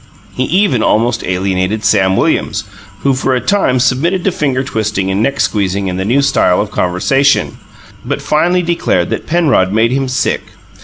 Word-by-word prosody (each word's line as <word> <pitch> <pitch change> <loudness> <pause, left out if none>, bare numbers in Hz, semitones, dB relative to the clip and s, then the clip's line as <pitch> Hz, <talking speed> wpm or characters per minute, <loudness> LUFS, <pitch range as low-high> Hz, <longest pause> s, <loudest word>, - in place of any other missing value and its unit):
He 130 - -1
even 180 - +1
almost 115 +3 +1
alienated 95 +3 -1
Sam 95 0 +2
Williams, - - 0 0.4
who 140 - +2
for 130 0 0
a - - +1
time 160 -8 +1
submitted 145 +9 +1
to 195 - +1
finger 135 -6 -1
twisting 105 -6 -2
and 95 +2 0
neck 140 +5 -1
squeezing 100 -2 -1
and 90 - -4
the 95 - -2
new 130 +6 +2
style 90 -9 +2
of 105 -1 -2
conversation, 135 +11 +1 0.4
but - - -3
finally 175 +4 +1
declared 165 - 0
that - - -4
Penrod 155 - +2
made 110 +3 +2
him 135 0 -1
"sick." 130 - -1
125 Hz, 170 wpm, -14 LUFS, 95-140 Hz, 0.4 s, Sam